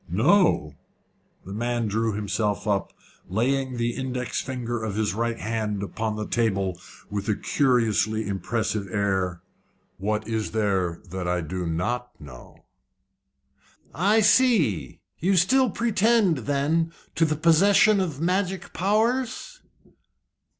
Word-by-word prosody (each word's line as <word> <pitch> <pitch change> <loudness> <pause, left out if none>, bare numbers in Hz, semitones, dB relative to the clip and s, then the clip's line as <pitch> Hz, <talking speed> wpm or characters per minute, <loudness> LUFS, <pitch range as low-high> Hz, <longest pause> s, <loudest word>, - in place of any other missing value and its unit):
"Know!" 110 - +3 0.7
The 95 - -7
man 120 +1 -1
drew 110 +1 0
himself 105 0 -2
up, 100 -2 0 0.4
laying 130 +5 0
the 120 0 0
index 130 -1 -3
finger 120 -3 -4
of 105 -3 -3
his 105 -2 0
right 115 +2 -1
hand 105 -2 -2
upon 110 +1 -3
the 105 0 -4
table 100 -6 -1 0.3
with 100 +1 -3
a 105 - +2
curiously 110 -5 +1
impressive 105 +1 -2
air. 95 -3 -1 0.6
"What 105 +2 -2
is 110 -2 -2
there 95 -6 0
that 95 -1 -4
I 90 0 0
do 90 +2 -4
not 120 +9 -3
know?" 65 -5 -13 1.3
"I 200 - +3
see. 200 - +3 0.2
You 190 +4 +2
still 255 +9 +4
pretend, 215 - +2
then, 155 +4 +1 0.2
to 165 - +1
the 155 -1 +2
possession 195 +6 +5
of 165 -7 -2
magic 185 +2 -1
powers?" 240 - 0
115 Hz, 120 wpm, -25 LUFS, 100-165 Hz, 1.3 s, possession